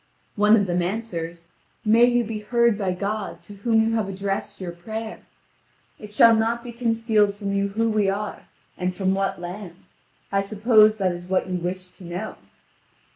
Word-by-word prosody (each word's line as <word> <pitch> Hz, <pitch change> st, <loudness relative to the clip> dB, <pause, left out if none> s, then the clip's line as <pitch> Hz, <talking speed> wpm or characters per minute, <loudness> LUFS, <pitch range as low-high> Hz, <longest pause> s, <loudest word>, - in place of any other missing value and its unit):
One 210 Hz, +1 st, +5 dB
of 205 Hz, -3 st, +2 dB
them 175 Hz, -1 st, 0 dB
answers: 175 Hz, -4 st, -4 dB, 0.4 s
"May 225 Hz, +3 st, +6 dB
you 245 Hz, 0 st, +2 dB
be 220 Hz, -1 st, -4 dB
heard 235 Hz, +1 st, +2 dB
by 195 Hz, -3 st, -1 dB
God, 200 Hz, -1 st, -4 dB
to 205 Hz, -, -11 dB
whom 220 Hz, +1 st, +2 dB
you -, -, 0 dB
have 220 Hz, -3 st, 0 dB
addressed 195 Hz, +1 st, -3 dB
your 180 Hz, -2 st, -5 dB
prayer. 220 Hz, +6 st, -6 dB, 0.8 s
It 210 Hz, -1 st, -10 dB
shall 230 Hz, +2 st, +6 dB
not 230 Hz, +2 st, 0 dB
be 245 Hz, -, -7 dB
concealed 225 Hz, -3 st, +1 dB
from 200 Hz, -1 st, -3 dB
you 200 Hz, 0 st, +1 dB
who 220 Hz, +3 st, 0 dB
we 215 Hz, -3 st, +2 dB
are, 205 Hz, +1 st, -4 dB, 0.3 s
and 180 Hz, 0 st, -1 dB
from 190 Hz, 0 st, +1 dB
what 195 Hz, -1 st, -1 dB
land: 175 Hz, 0 st, -7 dB, 0.6 s
I 195 Hz, 0 st, +2 dB
suppose 215 Hz, +1 st, +4 dB
that 190 Hz, -3 st, +1 dB
is 175 Hz, 0 st, -7 dB
what 190 Hz, 0 st, 0 dB
you 180 Hz, -1 st, -2 dB
wish 180 Hz, +1 st, -4 dB
to 185 Hz, -, -16 dB
know." 180 Hz, +5 st, -5 dB
205 Hz, 185 wpm, -24 LUFS, 185-220 Hz, 0.8 s, May